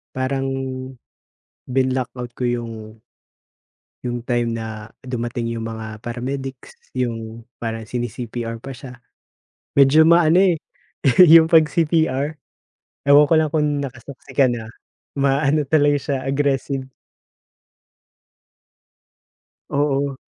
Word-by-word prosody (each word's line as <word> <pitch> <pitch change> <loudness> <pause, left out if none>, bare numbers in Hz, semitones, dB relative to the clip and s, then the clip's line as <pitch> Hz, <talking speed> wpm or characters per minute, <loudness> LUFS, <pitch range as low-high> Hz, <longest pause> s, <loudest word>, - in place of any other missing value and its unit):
Parang 135 +1 -1 1.2
binlock-out 130 -1 -1
ko - - -5
yung 115 -3 -4 1.0
yung 120 -1 -4
time 120 -1 0
na 110 -1 -7 0.2
dumating 120 -1 -3
yung 115 - -4
mga 110 -1 -7
paramedics, 130 +2 -6 0.2
yung 115 -2 -4 0.2
parang 115 -1 -4
sini-CPR 120 -1 -4
pa 135 +4 -8
siya, 125 0 -11 0.8
medyo 140 +3 +7
maano, 170 +1 +5
eh, 180 -4 +3 0.7
yung 165 0 +9
'pag 160 -1 +5
CPR. 160 -3 +1 0.7
Ewan 145 +1 +7
ko - - +4
lang 155 -1 +2
kung 150 -1 +2
naka-saksi 135 0 -9
ka 140 - +4
na 120 -2 -4 0.5
ma-ano 140 +2 +2
talaga 145 -2 +4
siya 140 0 -2
aggressive. 135 -1 -1 2.8
Oo. 140 -1 0
130 Hz, 100 wpm, -21 LUFS, 120-145 Hz, 2.8 s, yung